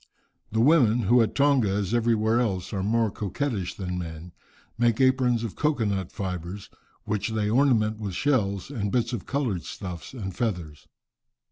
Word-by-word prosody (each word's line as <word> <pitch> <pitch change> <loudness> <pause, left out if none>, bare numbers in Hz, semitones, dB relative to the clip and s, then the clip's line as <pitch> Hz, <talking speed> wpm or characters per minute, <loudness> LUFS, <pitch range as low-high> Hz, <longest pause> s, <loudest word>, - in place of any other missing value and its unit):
The 110 +1 +1
women, 125 -5 +5
who 120 +4 +4
at 115 - 0
Tonga, 140 -6 +3
as 100 +1 -1
everywhere 115 -1 +2
else, 95 -7 -1
are 95 - -1
more 110 +2 +1
coquettish 105 -1 -3
than 90 -2 -4
men, 85 0 -7 0.4
make 120 -2 +2
aprons 130 -3 +3
of 115 - -4
cocoa 150 -7 +1
nut 95 -3 -2
fibres, 90 0 -5 0.3
which 105 0 -2
they 105 -1 -1
ornament 110 -4 +3
with 100 -4 -4
shells, 110 -5 0
and 105 -7 -2
bits 120 +1 0
of 115 - -5
coloured 125 -10 -1
stuffs 90 -1 -7
and 95 -7 -5
feathers. 90 -9 -3
110 Hz, 160 wpm, -26 LUFS, 95-120 Hz, 0.4 s, women